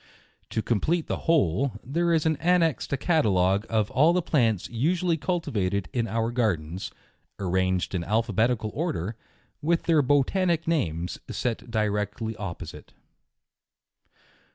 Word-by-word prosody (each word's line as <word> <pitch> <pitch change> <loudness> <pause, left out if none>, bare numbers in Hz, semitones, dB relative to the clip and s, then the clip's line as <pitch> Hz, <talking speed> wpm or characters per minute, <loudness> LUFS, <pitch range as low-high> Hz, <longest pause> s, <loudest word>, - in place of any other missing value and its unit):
To 110 - -2
complete 155 - 0
the - - -5
whole, 135 - +2
there 170 +6 0
is 160 -2 +2
annexed 165 -2 +2
a 140 - +1
catalogue 100 - +2
oi 110 -1 +3
all 155 +6 +4
the 180 - +2
plants 115 - +1
usually 165 +8 +1
cultivated 110 - -1
in 115 -2 0
our 115 +2 -1
Gardens, 95 -8 -1 0.5
arranged 95 -1 0
in 90 -3 -1
alphabetical 110 +2 +1
order* 135 - -2 0.5
with 165 +2 +1
their 160 -3 +4
botanic 160 +5 +2
names 90 - -1
set 120 0 -3
direct 105 -2 -1
ly 110 -1 -3
opposite. 90 -5 -7
115 Hz, 125 wpm, -26 LUFS, 100-160 Hz, 0.5 s, all